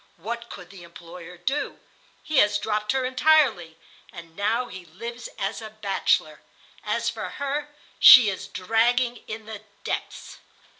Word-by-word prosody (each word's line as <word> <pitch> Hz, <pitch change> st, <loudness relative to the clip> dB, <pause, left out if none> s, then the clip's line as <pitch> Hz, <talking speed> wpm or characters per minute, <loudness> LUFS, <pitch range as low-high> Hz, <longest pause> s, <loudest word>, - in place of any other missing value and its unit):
What 235 Hz, +6 st, -6 dB
could 180 Hz, -1 st, -11 dB
the 195 Hz, -3 st, -13 dB
employer 170 Hz, +1 st, -12 dB
do? 275 Hz, +9 st, -3 dB, 0.5 s
He 310 Hz, -, -2 dB
has 205 Hz, 0 st, +4 dB
dropped 210 Hz, 0 st, -2 dB
her 265 Hz, -1 st, 0 dB
entirely, 255 Hz, -, +2 dB, 0.3 s
and 165 Hz, -1 st, -12 dB
now 220 Hz, +6 st, 0 dB
he 190 Hz, -6 st, -10 dB
lives 235 Hz, +7 st, -8 dB
as 195 Hz, +4 st, -3 dB
a 220 Hz, -, -8 dB
bachelor. 210 Hz, -2 st, -1 dB, 0.4 s
As -, -, -2 dB
for -, -, -3 dB
her, 285 Hz, +1 st, -4 dB, 0.3 s
she 250 Hz, -4 st, +10 dB
is 195 Hz, -2 st, -3 dB
dragging 235 Hz, +5 st, +1 dB
in 220 Hz, 0 st, -7 dB
the 220 Hz, -2 st, -8 dB, 0.2 s
depths." -, -, -5 dB
220 Hz, 145 wpm, -24 LUFS, 185-245 Hz, 0.5 s, she